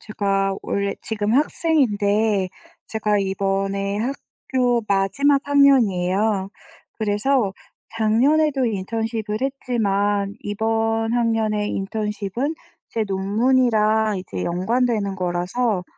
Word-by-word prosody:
제가 195 -2 -1
원래 200 0 -1
지금 215 -1 -2
학생인데 220 - +2 0.4
제가 210 -2 0
이번에 195 +1 -1
학교 245 0 -1
마지막 230 +9 +2
학년이에요. 210 -8 +3 0.5
그래서 215 0 +1 0.4
작년에도 265 +5 +2
인턴십을 220 +1 -3
했지만 205 -7 0
이번 225 +2 0
학년에 220 -3 0
인턴십은 210 - -3 0.4
제 225 - -1
논문이랑 215 +1 +2
이제 95 - -5
연관되는 205 +3 0
거라서 180 +4 -1
215 Hz, 235 characters per minute, -22 LUFS, 195-240 Hz, 0.5 s, 학년이에요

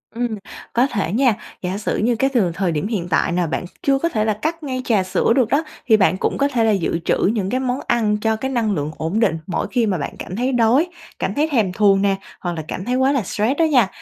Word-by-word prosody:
Ừm, 240 +1 0 0.5
có 245 +3 +3
thể 200 - -2
nha, 240 +1 +3 0.3
giả 185 +1 -2
sử 210 - -2
như 235 +3 +1
cái 270 +4 +1
từ 200 -9 +2
thời 180 0 0
điểm 155 +4 -1
hiện 195 -7 -2
tại 155 +1 +2
nà 175 -1 0
bạn 160 - -3 0.2
chưa 275 -1 +3
có 335 - 0
thể 215 -8 0
là 215 - +2
cắt 325 +1 -2
ngay 255 -3 -3
trà 210 -5 +2
sữa 185 +4 +1
được 250 -5 +2
đó, 285 +5 +2 0.2
thì 220 - +6
bạn 190 -2 +3
cũng - - -1
có 280 - +2
thể 245 -5 0
là 220 - +3
dự 180 -4 0
trữ - - +2 0.2
những 200 -4 -1
cái 255 - 0
món 255 0 -1
ăn 215 -3 +2
cho 220 0 +1
cái 265 +5 -3
năng 230 -4 0
lượng 150 -3 -2
ổn 165 +7 -1
định 195 -8 +2
mỗi 185 - -2
khi 240 -3 +2
mà 195 -4 0
bạn 140 - -4
cảm 180 - -6
thấy 250 +5 0
đói, 245 +7 +3 0.3
cảm - - -1
thấy 300 +2 +1
thèm 215 -9 +1
thuồng 195 -1 +4
nè 200 -1 +2 0.2
hoặc 175 -1 -3
là 160 - -4
cảm 185 - -5
thấy 250 - 0
quá 260 +1 +3
là 275 -3 +1
stress 220 +8 -1
đó 330 - +5
nha. 255 -10 +4
220 Hz, 275 wpm, -20 LUFS, 190-255 Hz, 0.5 s, thì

